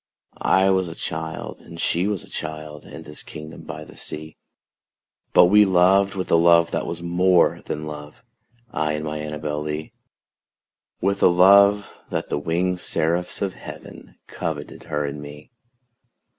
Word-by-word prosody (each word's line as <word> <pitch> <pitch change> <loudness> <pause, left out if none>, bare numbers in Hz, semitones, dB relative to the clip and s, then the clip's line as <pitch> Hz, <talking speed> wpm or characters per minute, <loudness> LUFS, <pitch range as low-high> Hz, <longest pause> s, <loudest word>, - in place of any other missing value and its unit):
I 95 0 +4
was 95 -1 +1
a 80 - -7
child 80 0 -5
and 85 - -12
she 90 +3 +1
was 105 -3 -2
a - - -14
child, 75 -1 -6
In 80 - -10
this 75 -1 -8
kingdom 75 0 -10
by 75 - -7
the - - -14
sea: 80 0 -6 1.0
But 90 - +7
we 105 +4 +6
loved 95 +1 +4
with 95 -1 -4
a - - +6
love 85 0 +5
that - - -2
was 85 0 -5
more 90 +1 +3
than 75 0 -4
love 75 -1 -9 0.5
I 75 -1 -1
and 75 0 -3
my 75 0 -4
ANNABEL 75 0 -4
LEE; 75 +1 -5 1.1
With 100 +1 0
a - - +7
love 100 +3 +5 0.2
that - - -3
the - - -1
winged 90 +4 -1
seraphs 85 +3 -1
of 95 -2 -2
heaven - - -11
Coveted - - -6
her 75 -2 -2
and 70 +1 -5
me. 75 +1 -11
85 Hz, 160 wpm, -23 LUFS, 75-90 Hz, 1.1 s, But